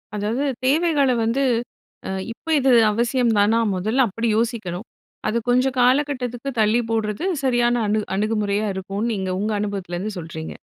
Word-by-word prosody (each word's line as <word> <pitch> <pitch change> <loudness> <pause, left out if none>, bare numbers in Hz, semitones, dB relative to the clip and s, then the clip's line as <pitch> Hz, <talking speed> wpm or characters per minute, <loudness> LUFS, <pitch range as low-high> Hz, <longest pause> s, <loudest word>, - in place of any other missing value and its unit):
அதாவது, 215 +6 -1 0.2
தேவைகள 295 0 +3
வந்து, 235 +5 +1 0.6
அ - - -4 0.2
"இப்ப 320 +7 -4
இது 265 -1 +3 0.2
அவசியம் 235 +2 +1
தானா?" 210 +3 +4 0.2
முதல்ல 220 +8 +2
அப்படி 225 +4 -2
யோசிக்கனும். 220 -4 -2 0.4
அத 220 +2 +1
கொஞ்ச 250 +1 +4
காலகட்டத்துக்கு 255 -1 +1
தள்ளி 220 +2 +3
போடறது 220 - -1 0.2
சரியான 240 -2 +2
அணு 215 +1 +1
அணுகுமுறையா 210 0 0
இருக்கும்னு, 195 +5 -3
நீங்க 190 -2 -3
உங்க 210 +2 -1
அனுபவத்துலிருந்து 200 -1 -3
சொல்றீங்க. 160 -1 -7
225 Hz, 135 wpm, -22 LUFS, 205-250 Hz, 0.6 s, தானா